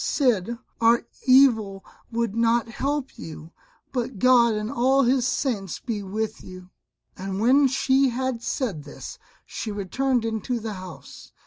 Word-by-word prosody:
Cid, 235 Hz, -, +1 dB, 0.2 s
our 230 Hz, +1 st, +4 dB, 0.2 s
evil 225 Hz, -7 st, +4 dB, 0.3 s
would 230 Hz, -2 st, -1 dB
not 230 Hz, 0 st, +2 dB
help 275 Hz, +3 st, -3 dB
you, 160 Hz, 0 st, -9 dB, 0.4 s
but 245 Hz, -3 st, -3 dB
God 240 Hz, 0 st, +5 dB
and 210 Hz, +2 st, -3 dB
all 265 Hz, +3 st, +3 dB
His 255 Hz, 0 st, +2 dB
saints 205 Hz, -, -2 dB
be 225 Hz, -4 st, -4 dB
with 215 Hz, +3 st, -4 dB
you." 185 Hz, 0 st, -11 dB, 0.4 s
And 190 Hz, 0 st, -5 dB
when 265 Hz, +6 st, +5 dB
she 265 Hz, +1 st, +2 dB
had 255 Hz, -1 st, -2 dB
said 210 Hz, -, -3 dB
this 145 Hz, -, -9 dB, 0.3 s
she 225 Hz, -, -5 dB
returned 230 Hz, +5 st, -1 dB
into 225 Hz, +2 st, -2 dB
the 220 Hz, -1 st, -5 dB
house. 185 Hz, -3 st, -11 dB
230 Hz, 140 wpm, -24 LUFS, 200-255 Hz, 0.4 s, God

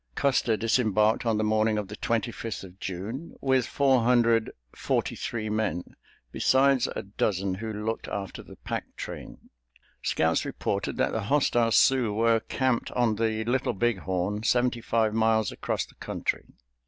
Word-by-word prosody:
Custer 125 Hz, -5 st, +2 dB
disembarked 110 Hz, -1 st, +2 dB
on 110 Hz, -2 st, +2 dB
the 110 Hz, -, 0 dB
morning 110 Hz, 0 st, +2 dB
of 105 Hz, -2 st, -2 dB
the 105 Hz, -, -7 dB
Twenty 115 Hz, +1 st, -1 dB
fifth 115 Hz, -3 st, -6 dB
of 95 Hz, 0 st, -13 dB
June, 105 Hz, -, -5 dB
with 130 Hz, -3 st, +2 dB
four 135 Hz, -3 st, +3 dB
hundred 115 Hz, -1 st, +3 dB, 0.3 s
forty -, -, -1 dB
three 110 Hz, -2 st, -4 dB
men, 105 Hz, -5 st, -2 dB, 0.4 s
besides 135 Hz, -, +3 dB
a -, -, -3 dB
dozen 100 Hz, -1 st, -1 dB
who 110 Hz, +4 st, -5 dB
looked 110 Hz, +2 st, -3 dB
after 100 Hz, -2 st, -5 dB
the -, -, -13 dB
pack -, -, -6 dB
train. -, -, -9 dB, 0.5 s
Scouts -, -, +1 dB
reported -, -, -3 dB
that -, -, +1 dB
the 110 Hz, -3 st, -2 dB
hostile 120 Hz, -3 st, +2 dB
Sioux 125 Hz, -1 st, +4 dB
were 115 Hz, +2 st, +3 dB
camped 130 Hz, +1 st, -1 dB
on 115 Hz, -4 st, +1 dB
the 110 Hz, 0 st, 0 dB
Little 125 Hz, +1 st, 0 dB
Big 115 Hz, 0 st, 0 dB
Horn, 95 Hz, +3 st, -2 dB
seventy 120 Hz, +1 st, +1 dB
five 110 Hz, -2 st, +1 dB
miles 110 Hz, -2 st, +2 dB
across -, -, -2 dB
the -, -, -20 dB
country. -, -, -3 dB
110 Hz, 160 wpm, -27 LUFS, 105-120 Hz, 0.5 s, Sioux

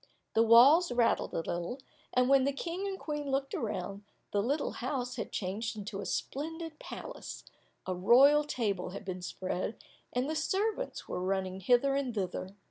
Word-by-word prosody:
The 225 Hz, -, +4 dB
walls 250 Hz, +9 st, +7 dB
rattled 240 Hz, -1 st, +2 dB
a -, -, +1 dB
little, 175 Hz, +8 st, -3 dB, 0.3 s
and 250 Hz, 0 st, +3 dB
when 270 Hz, 0 st, +5 dB
the 280 Hz, -, +2 dB
King 345 Hz, +7 st, -3 dB
and 390 Hz, -1 st, -3 dB
Queen 295 Hz, -4 st, -4 dB
looked 270 Hz, 0 st, -1 dB
round, 200 Hz, -2 st, -3 dB, 0.3 s
the 205 Hz, -, +2 dB
little 280 Hz, +7 st, 0 dB
house 250 Hz, -1 st, -3 dB
had 230 Hz, -, -4 dB
changed 215 Hz, +4 st, -3 dB
into 205 Hz, -1 st, -5 dB
a -, -, -5 dB
splendid 325 Hz, +2 st, -4 dB
palace, -, -, -8 dB, 0.4 s
a 185 Hz, -, -1 dB
royal 265 Hz, +11 st, +6 dB
table 205 Hz, -11 st, -2 dB
had -, -, -10 dB
been 185 Hz, -1 st, -4 dB
spread, 185 Hz, +3 st, -3 dB, 0.3 s
and 250 Hz, +2 st, 0 dB
the 315 Hz, -, -2 dB
servants 415 Hz, +9 st, -1 dB
were -, -, -3 dB
running 190 Hz, 0 st, -1 dB
hither 245 Hz, +7 st, +3 dB
and 270 Hz, -4 st, -1 dB
thither. 190 Hz, 0 st, -3 dB
245 Hz, 170 wpm, -31 LUFS, 195-290 Hz, 0.4 s, walls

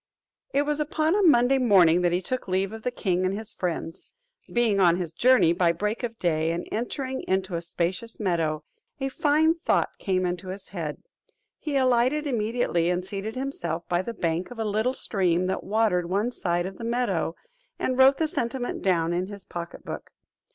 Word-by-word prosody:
It 280 Hz, -, +2 dB
was 295 Hz, 0 st, -1 dB
upon 310 Hz, +2 st, +1 dB
a 415 Hz, -, +3 dB
Monday 270 Hz, -6 st, +5 dB
morning 180 Hz, -8 st, +5 dB
that 175 Hz, -1 st, +2 dB
he 180 Hz, +2 st, 0 dB
took 255 Hz, +4 st, -3 dB
leave 190 Hz, +2 st, 0 dB
of 225 Hz, -, -7 dB
the 250 Hz, -, -1 dB
king 185 Hz, -7 st, -1 dB
and 185 Hz, +1 st, 0 dB
his 220 Hz, -1 st, -7 dB
friends. 170 Hz, -2 st, -4 dB, 0.4 s
Being 230 Hz, -4 st, +2 dB
on 175 Hz, -3 st, +5 dB
his 175 Hz, -3 st, -3 dB
journey 240 Hz, -1 st, +4 dB
by 175 Hz, -1 st, +3 dB
break 210 Hz, +6 st, -2 dB
of 230 Hz, -2 st, -4 dB
day, 160 Hz, -4 st, +1 dB
and 170 Hz, +1 st, -3 dB
entering 260 Hz, +3 st, -3 dB
into 190 Hz, 0 st, 0 dB
a 170 Hz, -, -1 dB
spacious 180 Hz, +6 st, -3 dB
meadow, 165 Hz, -6 st, 0 dB, 0.4 s
a 270 Hz, 0 st, -1 dB
fine 305 Hz, +4 st, +3 dB
thought 335 Hz, -, 0 dB
came 185 Hz, -2 st, 0 dB
into 180 Hz, +1 st, -3 dB
his 190 Hz, +1 st, -7 dB
head; 165 Hz, -6 st, -5 dB, 0.6 s
he 295 Hz, -3 st, -1 dB
alighted 260 Hz, +3 st, +2 dB
immediately, 225 Hz, -, 0 dB
and 180 Hz, +1 st, -1 dB
seated 200 Hz, +3 st, -5 dB
himself 175 Hz, -, -3 dB
by 175 Hz, 0 st, +1 dB
the 230 Hz, +4 st, -6 dB
bank 170 Hz, 0 st, -1 dB
of 245 Hz, -, -10 dB
a 225 Hz, -, -2 dB
little 220 Hz, +5 st, 0 dB
stream 185 Hz, -6 st, +1 dB
that 190 Hz, -, -2 dB
watered 195 Hz, -4 st, +1 dB
one 205 Hz, +6 st, 0 dB
side 175 Hz, -6 st, -1 dB
of 190 Hz, 0 st, -7 dB
the -, -, -6 dB
meadow, 230 Hz, -9 st, 0 dB, 0.4 s
and 255 Hz, 0 st, -1 dB
wrote 270 Hz, +1 st, +7 dB
the 320 Hz, -, +1 dB
sentiment 245 Hz, -3 st, -2 dB
down 170 Hz, -3 st, +1 dB
in 180 Hz, +2 st, -1 dB
his 200 Hz, -1 st, -10 dB
pocket 170 Hz, -1 st, -7 dB
book. -, -, -6 dB
200 Hz, 195 wpm, -26 LUFS, 175-245 Hz, 0.6 s, wrote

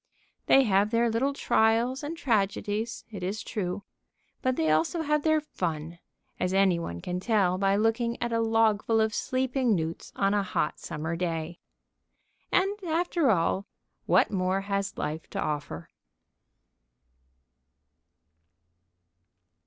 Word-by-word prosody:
They 270 Hz, -, +6 dB
have 200 Hz, -2 st, +3 dB
their 230 Hz, +1 st, +2 dB
little 255 Hz, +5 st, +1 dB
trials 235 Hz, 0 st, +2 dB
and 310 Hz, +3 st, -5 dB
tragedies, 215 Hz, -, -1 dB
it 200 Hz, -4 st, -7 dB
is 195 Hz, +4 st, -3 dB
true, 200 Hz, -2 st, -3 dB, 0.6 s
but 255 Hz, 0 st, +1 dB
they 160 Hz, -6 st, +1 dB
also 165 Hz, -, +1 dB
have 300 Hz, 0 st, +1 dB
their 315 Hz, 0 st, +3 dB
fun, 170 Hz, -, -4 dB, 0.4 s
as 180 Hz, +1 st, 0 dB
any 190 Hz, -3 st, +4 dB
one 85 Hz, -, -5 dB
can 180 Hz, 0 st, -3 dB
tell 190 Hz, -3 st, +1 dB
by 195 Hz, 0 st, +3 dB
looking 225 Hz, +2 st, 0 dB
at 235 Hz, -1 st, -2 dB
a 230 Hz, -, +2 dB
logful 225 Hz, -1 st, +2 dB
of 220 Hz, 0 st, +1 dB
sleeping 255 Hz, -2 st, 0 dB
newts 165 Hz, -1 st, -4 dB
on 195 Hz, 0 st, +1 dB
a 205 Hz, -, +2 dB
hot 185 Hz, -5 st, -2 dB
summer 160 Hz, 0 st, -4 dB
day. 165 Hz, -1 st, -3 dB, 0.9 s
And, 395 Hz, +2 st, +2 dB
after 335 Hz, -3 st, +1 dB
all, 190 Hz, 0 st, +1 dB, 0.4 s
what -, -, +4 dB
more 190 Hz, 0 st, 0 dB
has 200 Hz, 0 st, -2 dB
life 155 Hz, +2 st, -4 dB
to -, -, -4 dB
offer? 145 Hz, -, -4 dB
205 Hz, 130 wpm, -28 LUFS, 180-240 Hz, 0.9 s, They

